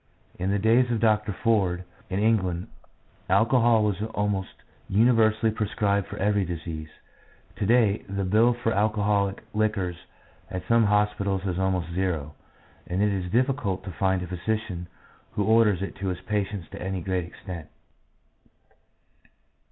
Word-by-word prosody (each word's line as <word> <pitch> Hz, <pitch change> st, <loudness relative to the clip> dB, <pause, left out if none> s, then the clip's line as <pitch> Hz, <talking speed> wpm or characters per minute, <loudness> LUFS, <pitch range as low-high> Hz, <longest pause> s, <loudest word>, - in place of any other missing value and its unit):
In 95 Hz, -, -1 dB
the 100 Hz, -, +2 dB
days 115 Hz, +5 st, +3 dB
of 115 Hz, -2 st, 0 dB
Dr. 105 Hz, -2 st, +2 dB
Ford, 95 Hz, -5 st, +1 dB, 0.3 s
in 95 Hz, -, -2 dB
England, 95 Hz, -5 st, +1 dB, 0.6 s
alcohol 115 Hz, -1 st, +4 dB
was 105 Hz, -2 st, 0 dB
almost 100 Hz, -2 st, -1 dB, 0.3 s
universally 110 Hz, +1 st, +3 dB
prescribed 100 Hz, -2 st, 0 dB
for -, -, -8 dB
every 105 Hz, 0 st, +2 dB
disease; 80 Hz, -3 st, -5 dB, 0.7 s
to 105 Hz, -, -1 dB
day 110 Hz, -3 st, +4 dB
the 100 Hz, 0 st, -2 dB
bill 110 Hz, +6 st, +3 dB
for 115 Hz, -2 st, -1 dB
alcoholic 100 Hz, -1 st, +1 dB
liquors 105 Hz, -5 st, 0 dB, 0.5 s
at 90 Hz, -, -6 dB
some 115 Hz, -1 st, +4 dB
hospitals 100 Hz, -2 st, +1 dB
is 90 Hz, -2 st, -1 dB
almost 90 Hz, -3 st, -1 dB
zero, 85 Hz, -5 st, -1 dB, 0.5 s
and 90 Hz, +3 st, 0 dB
it 105 Hz, -1 st, +2 dB
is 90 Hz, -2 st, -3 dB
difficult 120 Hz, -6 st, 0 dB
to 95 Hz, -, -6 dB
find 95 Hz, +1 st, 0 dB
a -, -, -6 dB
physician 90 Hz, 0 st, -3 dB, 0.5 s
who 105 Hz, -, 0 dB
orders 110 Hz, -4 st, +4 dB
it 100 Hz, -, -5 dB
to 95 Hz, 0 st, -3 dB
his 90 Hz, -1 st, -2 dB
patients 100 Hz, -2 st, -2 dB
to -, -, -8 dB
any 95 Hz, 0 st, -3 dB
great 90 Hz, 0 st, -1 dB
extent. 85 Hz, -2 st, -9 dB
100 Hz, 145 wpm, -26 LUFS, 95-110 Hz, 0.7 s, alcohol